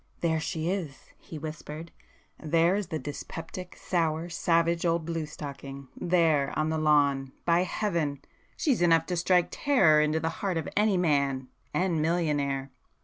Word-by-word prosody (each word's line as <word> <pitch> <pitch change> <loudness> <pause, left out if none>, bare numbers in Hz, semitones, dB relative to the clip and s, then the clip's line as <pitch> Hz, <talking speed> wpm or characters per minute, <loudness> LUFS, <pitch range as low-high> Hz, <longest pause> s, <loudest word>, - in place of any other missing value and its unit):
"There 160 -2 +1
she 160 +1 -3
is!" 175 -7 -4
he 160 - -9
whispered, 155 +1 -7 0.5
"There 165 +3 +3
is 205 -1 -2
the 160 - -3
dyspeptic, 165 +4 -7
sour, 165 -1 -1
savage 170 0 +1
old 170 -2 +1
blue 165 -2 -3
stocking,—there, 145 +2 -1
on 155 0 +1
the 160 0 0
lawn,—by 145 +2 +2
Heaven!—she's 175 - -2
enough 165 -2 +4
to 180 - -2
strike 175 0 +3
terror 165 - +4
into 155 +1 +1
the 160 +1 -1
heart 190 -4 0
of 160 - -3
any 210 -2 +3
man—and 150 +2 0
millionaire!" 145 -5 0
160 Hz, 135 wpm, -28 LUFS, 150-175 Hz, 0.5 s, enough